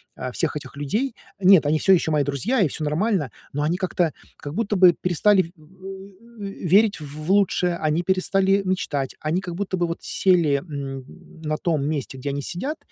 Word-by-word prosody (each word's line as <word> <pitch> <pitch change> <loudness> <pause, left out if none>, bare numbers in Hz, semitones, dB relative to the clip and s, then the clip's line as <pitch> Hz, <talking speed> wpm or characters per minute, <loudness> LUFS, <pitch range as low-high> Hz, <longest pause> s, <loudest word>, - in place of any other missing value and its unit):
э, 125 - -5
всех 155 +5 -1
этих 145 -1 -7
людей. 215 - -1 0.3
Нет, 185 -4 +6
они 150 +2 +2
всё 195 - +3
ещё 165 -4 +3
мои 150 -1 +3
друзья, 145 - 0
и 175 - +3
всё 155 - -4
нормально, 160 - 0 0.2
но 145 +1 -2
они 160 +3 +1
как-то 180 -4 0 0.2
как 145 - -7
будто 210 +1 -1
бы 180 -1 +7
перестали, 185 +4 +3
э, 165 - -13
м, 190 +7 -13
э, - - -7 0.2
верить 200 +1 +4
в 150 +2 -7
лучшее, 185 -3 +2
они 155 +1 0
перестали 190 +1 +2
мечтать, 145 -8 -2
они 160 +4 -1
как 175 -3 -6
будто 190 0 -2
бы 175 -1 0
вот 170 - -3
сели, 170 -7 +2
м, 140 -4 -6 0.4
на 155 -1 -2
том 155 -4 0
месте, 145 -3 -3
где 130 +2 -4
они 140 0 -2
сидят, 260 - -4
175 Hz, 195 wpm, -23 LUFS, 150-195 Hz, 0.4 s, бы